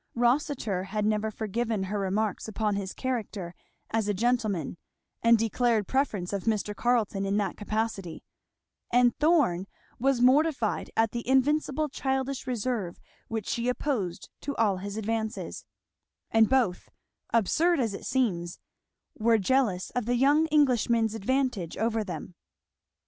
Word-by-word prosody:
Rossitur 240 - +1
had 210 +2 -2
never 215 0 +1
forgiven 220 0 -2
her 205 +2 -2
remarks 200 +2 -1
upon 215 -1 -1
his 195 -1 -3
character 215 -8 -4 0.4
as 225 -2 0
a 205 - 0
gentleman 215 - 0 0.4
and 230 0 +6
declared 225 -1 +1
preference 210 -9 -1
of 200 - -3
Mr. 210 -2 0
Carleton 225 -5 +1
in 195 +1 0
that 200 -3 -1
capacity; 210 -4 -3 0.7
and 245 -1 +4
Thorn 290 - +3 0.3
was 265 0 +2
mortified 260 -2 +2
at 225 -1 +3
the 235 -1 -5
invincible 295 +2 +2
childish 265 -1 -2
reserve 230 -6 -2 0.3
which 220 -3 -4
she 235 +1 -1
opposed 245 - -2
to 280 - -4
all 205 -4 +2
his 200 +2 -6
advances; 220 +1 -3 0.7
and 225 -1 +5
both, 245 -9 +1 0.4
absurd 320 - +3
as 225 -5 0
it - - -6
seems, 175 -10 0 0.6
were 225 +1 +4
jealous 210 -3 +1
of 245 -3 -2
the 245 - +2
young 290 +5 +4
Englishman's 240 -7 +3
advantage 225 -5 -1
over 225 0 0
them. 180 -2 -7
225 Hz, 135 wpm, -28 LUFS, 205-255 Hz, 0.7 s, and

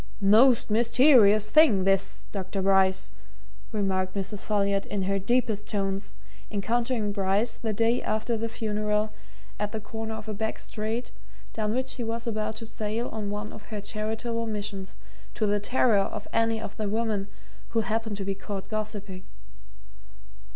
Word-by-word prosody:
"Most 240 0 +6
mysterious 230 -2 +5
thing, 245 -12 +6
this, 195 0 +1
Dr. 195 0 -3
Bryce," 190 -1 +3 0.6
remarked 190 -3 0
Mrs. 200 +1 -3
Folliot 200 -1 +1
in 200 -2 -2
her 195 +1 0
deepest 215 0 0
tones, 195 -1 -2 0.3
encountering 225 +1 0
Bryce, 200 +3 +1
the 225 - -3
day 230 +3 +2
after 220 +2 -1
the 225 +1 -2
funeral, 215 -1 -1 0.5
at 210 +1 -2
the 220 - -2
corner 220 +1 -5
of 220 0 -8
a 215 - -3
back 220 +2 -2
street 220 +3 -3 0.4
down 215 0 -1
which 260 0 0
she 245 - -4
was 230 +1 -3
about 215 -1 -2
to 225 - -7
sail 220 +1 -2
on 215 -2 -4
one 210 +1 -4
of 210 - -11
her 215 -2 -4
charitable 225 +2 -3
missions, 205 -3 -4 0.4
to 215 - +1
the 205 0 +2
terror 235 0 +3
of 205 +1 -3
any 225 0 +2
of 215 -2 -7
the 215 -2 -1
women 215 -2 -1 0.4
who 230 -1 +1
happened 220 -1 -2
to 195 - -4
be 195 - 0
caught 195 0 -6
gossiping. 205 -3 -4
215 Hz, 160 wpm, -27 LUFS, 200-225 Hz, 0.6 s, Most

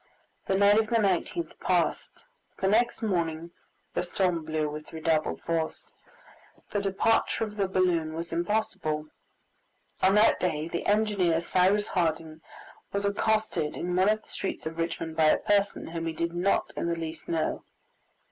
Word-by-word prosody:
The 190 - +2
night 200 +2 +6
of 220 - +1
the 235 - 0
19th 215 - 0
passed, - - -1 0.3
but - - -20
the 190 - +2
next 235 +3 +2
morning 170 -4 -1 0.4
the - - 0
storm 180 -2 0
blew 155 -1 -1
with 150 +1 -7
redoubled 160 -1 0
force. 165 -1 -3 0.8
The 205 - 0
departure 200 +4 +1
of 210 -1 -5
the 200 -2 0
balloon 175 -4 +1
was 165 +1 -5
impossible. 170 -4 -1 0.9
On 190 +2 +4
that 210 +1 +5
day 155 -3 -1
the 170 - -3
engineer, 205 -6 +2
Cyrus 185 +4 +2
Harding, 160 -3 -1 0.5
was 200 0 -1
accosted 205 -6 0
in 180 +1 -2
one 185 +3 +4
of 215 0 +1
the - - -23
streets 195 - -4
of 160 +1 -5
Richmond 165 -1 -3
by 160 - +4
a 155 - +5
person 205 -1 +1
whom 165 0 -4
he 165 - -2
did 170 +1 -2
not 180 +3 0
in - - -2
the 170 - 0
least 160 -1 -6
know. 165 -2 -1
175 Hz, 165 wpm, -28 LUFS, 160-200 Hz, 0.9 s, night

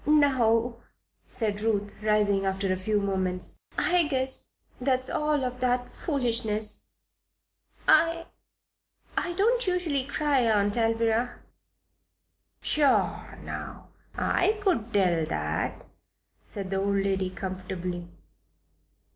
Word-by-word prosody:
"Now," 245 -6 +3 0.5
said 210 -3 -1
Ruth, 205 -2 0
rising 210 -2 +2
after 190 0 0
a - - 0
few 205 +3 0
moments, 190 -2 -2 0.2
"I 355 -3 +4
guess 265 -2 -1 0.3
that's 255 0 +1
all 300 -2 +1
of 250 0 -4
that 250 0 0
foolishness. 225 -7 -1 1.0
I 330 0 +4 0.9
I 350 - 0
don't 460 +5 +2
usually 335 -7 0
cry, 285 0 +1
Aunt 205 -1 +2
Alvirah." 230 +1 +1 1.2
"Pshaw, 290 -3 +1
now! - - -7 0.3
I 430 - +1
could 240 - +1
tell 180 -6 +2
that," 75 - -2 0.6
said 195 -2 -6
the 195 - 0
old 200 +1 +1
lady, 195 -1 0
comfortably. 185 -2 -5
225 Hz, 105 wpm, -27 LUFS, 195-275 Hz, 1.2 s, I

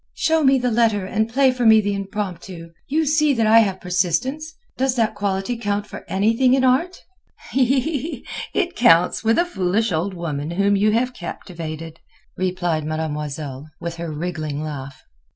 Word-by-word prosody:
"Show 320 -1 +2
me 270 -1 +5
the 250 -1 0
letter 220 -4 +2
and 220 +3 -1
play 265 +1 +4
for 250 -1 -3
me 220 -1 +7
the 205 -1 0
Impromptu. 190 -4 -5 0.2
You 315 +3 +1
see 305 0 +3
that 225 -2 +2
I 220 +1 +7
have 195 -4 +1
persistence. 195 - -1 0.2
Does 265 0 0
that 225 -3 +1
quality 200 +2 -2
count 205 -2 -2
for - - -10
anything 230 +6 +3
in 265 - +1
art?" 300 +9 +1 0.5
"It 280 +6 -1
counts 180 -7 +4
with 225 +1 +3
a 345 - +3
foolish 205 - 0
old 180 +4 -1
woman 155 -4 -4
whom 200 +4 +2
you 205 +2 +3
have 250 +3 0
captivated," 165 -4 -7 0.4
replied 175 -4 -1
Mademoiselle, 150 -2 -4
with 170 0 -5
her 170 -1 -5
wriggling 155 -2 -4
laugh. 140 -3 -7
200 Hz, 160 wpm, -21 LUFS, 170-250 Hz, 0.5 s, me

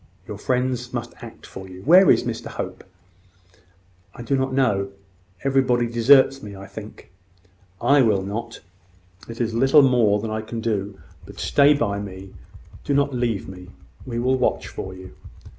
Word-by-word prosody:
Your - - -7
friends 125 -1 -2
must - - -5
act - - -11
for 95 0 -10
you. 95 +1 -11
Where 180 +6 +6
is - - +4
Mr - - -5
Hope?" - - -6 1.3
"I 120 - -8
do 130 +4 0
not 130 0 -1
know. 100 -8 +1 0.5
Everybody 130 -3 +2
deserts 130 +3 +4
me, 105 -1 -9
I 95 0 -10
think." 105 -2 -11 0.7
"I 140 +4 +4
will 105 -6 +2
not. 115 +4 -6 0.7
It 115 - -8
is 115 -2 -1
little 120 -5 +3
I 110 0 -2
can 115 +1 -6
do; 100 -3 -3 0.3
but - - -12
stay 145 +1 +4
by 100 -7 -1
me: 95 -1 -9 0.5
do 140 - -1
not 140 0 +1
leave 120 -5 -2
me. 90 -1 -11 0.4
I 115 - -3
will 130 +2 +1
watch - - 0
for 95 0 -7
you." 95 0 -12
115 Hz, 160 wpm, -22 LUFS, 100-130 Hz, 1.3 s, Where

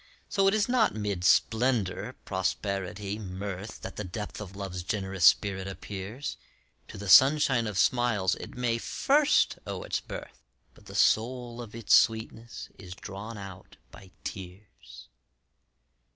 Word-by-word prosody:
So 195 -2 +2
it 195 - +4
is 210 -2 +2
not 245 - +2
mid 100 -4 -2
splendor, 110 -1 +2
prosperity, 100 +1 -2
mirth, 100 +1 -6
That - - -8
the 105 - -3
depth 105 +3 -6
of 100 -2 -8
Love's 95 -2 -5
generous 95 -2 -1
spirit 95 0 +4
appears; 100 +7 -6 0.5
To - - -10
the 100 0 -7
sunshine 130 +1 +6
of 105 -3 -4
smiles 110 -2 +2
it - - -8
may 120 -2 0
first 290 - +2
owe - - -4
its - - -2
birth, - - -9 0.3
But - - -19
the - - -10
soul 120 +1 +1
of 115 -2 -10
its 115 -3 0
sweetness 115 +1 +2
is 90 -1 -9
drawn 105 +5 -8
out 95 -2 -10
by 95 - -14
tears. 95 - -10
105 Hz, 140 wpm, -28 LUFS, 95-120 Hz, 0.5 s, sunshine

